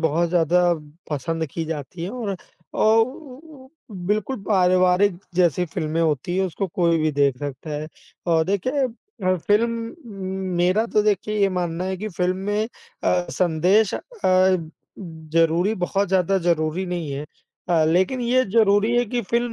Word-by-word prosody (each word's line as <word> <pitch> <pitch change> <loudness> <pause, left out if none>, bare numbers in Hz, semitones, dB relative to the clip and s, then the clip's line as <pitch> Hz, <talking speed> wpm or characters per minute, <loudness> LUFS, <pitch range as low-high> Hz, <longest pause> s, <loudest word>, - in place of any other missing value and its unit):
बहुत 165 +2 +1
ज़्यादा 175 +1 +3 0.5
पसंद 160 +2 -2
की 165 - -3
जाती 160 +1 -6
हैं 180 - -3
और, 220 -6 -4 0.4
और 225 +1 +4
उ 260 -1 -11 0.3
उ 260 - -18 0.4
बिल्कुल 215 +6 0
पारिवारिक 185 -1 +3 0.2
जैसी 180 -1 +2
फ़िल्में 155 +1 -2
होती 160 +2 0
हैं 190 0 +2
उसको 190 +3 -3
कोई 170 -2 +2
भी 155 0 +1
देख 140 -2 +2
सकता 145 +2 -6
है 150 +1 -4 0.4
और 165 -2 +3
देखिए 255 - 0
अ, 225 - -3
फ़िल्म 230 - 0 0.6
मेरा 185 +6 +2
तो 210 -2 +2
देखिए 210 +1 0
ये 200 - +4
मानना 175 0 -2
है 190 0 -2
कि 215 +3 -5
फ़िल्म 180 0 -1
में 205 +3 -1 0.4
अ, 90 -1 +2
संदेश 180 +5 +2
अ, - - -3 1.0
ज़रूरी 165 +2 0
बहुत 195 +1 -1
ज़्यादा 190 0 +2
ज़रूरी 170 0 0
नहीं 175 -4 -3
है 140 +2 -4 0.4
अ, 165 -3 +3
लेकिन 185 +10 +2
ये 250 +2 +2
ज़रूरी 210 0 +4
है 245 - +3
कि 245 +3 -1
फ़िल्म 235 +4 -1
180 Hz, 155 wpm, -23 LUFS, 165-210 Hz, 1.0 s, और